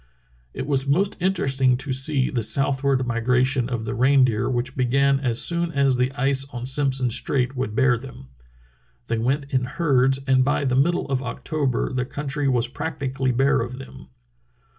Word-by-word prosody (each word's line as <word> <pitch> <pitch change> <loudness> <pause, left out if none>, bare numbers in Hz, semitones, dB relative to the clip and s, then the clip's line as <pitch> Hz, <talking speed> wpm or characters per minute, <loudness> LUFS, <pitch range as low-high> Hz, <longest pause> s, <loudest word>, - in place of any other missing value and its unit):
It - - -4
was 140 -2 0
most 190 +8 +1
interesting 135 -9 +1
to 135 +1 -4
see 135 0 +1
the 120 - -1
southward 135 +3 +1
migra 125 +1 +1
tion 130 -2 -1
of 115 -3 -3
the 110 - -3
reindeer, 130 -3 +2
which 125 +1 -2
began 135 +2 +2
as 120 -4 0
soon 170 0 +1
as 140 -2 +2
the 125 +1 0
ice 135 0 +1
on 120 0 -6
Simpson 130 -2 +1
Strait 130 +2 -1
would 125 -4 -3
bear 130 -2 +3
them. 120 - -12 0.8
They 115 - 0
went 140 +4 -1
in 130 -1 +1
herds, 135 -2 +1
and 130 -1 +3
by 140 +1 0
the 130 -1 +1
middle 165 +7 +1
of 135 -2 -1
October 135 +1 -2
the 125 -1 -1
country 145 +1 -3
was 120 -3 +1
practi 135 0 -5
cally 130 -1 0
bare 135 0 +2
of 125 +2 -5
them. 135 - -12
130 Hz, 180 wpm, -23 LUFS, 125-140 Hz, 0.8 s, bear